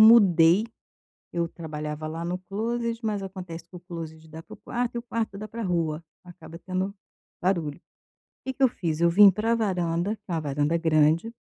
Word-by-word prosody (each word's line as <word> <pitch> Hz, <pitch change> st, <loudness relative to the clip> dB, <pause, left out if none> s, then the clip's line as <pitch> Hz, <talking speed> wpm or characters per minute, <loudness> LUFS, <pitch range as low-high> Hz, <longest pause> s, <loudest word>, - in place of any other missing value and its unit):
mudei, 200 Hz, -4 st, +7 dB, 0.7 s
eu 170 Hz, -1 st, 0 dB
trabalhava 155 Hz, -2 st, -5 dB
lá 165 Hz, +2 st, -4 dB
no 180 Hz, +1 st, -2 dB
closet, 230 Hz, +4 st, -3 dB
mas 210 Hz, -2 st, -1 dB
acontece 185 Hz, -4 st, -7 dB
que -, -, -20 dB
o 175 Hz, -, -10 dB
closet 160 Hz, -3 st, -8 dB
dá 160 Hz, +1 st, -9 dB
para -, -, -12 dB
o -, -, -14 dB
quarto 245 Hz, 0 st, -3 dB
e -, -, +1 dB
o 235 Hz, -, -5 dB
quarto 230 Hz, -4 st, -3 dB
dá 215 Hz, +1 st, -6 dB
para 230 Hz, +1 st, -5 dB
rua, 165 Hz, -3 st, 0 dB, 0.2 s
acaba 175 Hz, -1 st, -11 dB
tendo 185 Hz, +2 st, -2 dB, 0.5 s
barulho. 170 Hz, -5 st, 0 dB, 0.7 s
Que 265 Hz, -, -1 dB
que 270 Hz, -, -4 dB
eu 260 Hz, -, +7 dB
fiz, 165 Hz, -7 st, -3 dB
eu 170 Hz, 0 st, +5 dB
vim 200 Hz, +3 st, +9 dB
para 220 Hz, +4 st, +1 dB
varanda, 185 Hz, -2 st, 0 dB
que 210 Hz, -, -42 dB
é -, -, -3 dB
uma 165 Hz, -, 0 dB
varanda 145 Hz, +2 st, 0 dB
grande 160 Hz, +5 st, +3 dB
175 Hz, 195 wpm, -26 LUFS, 165-210 Hz, 0.7 s, vim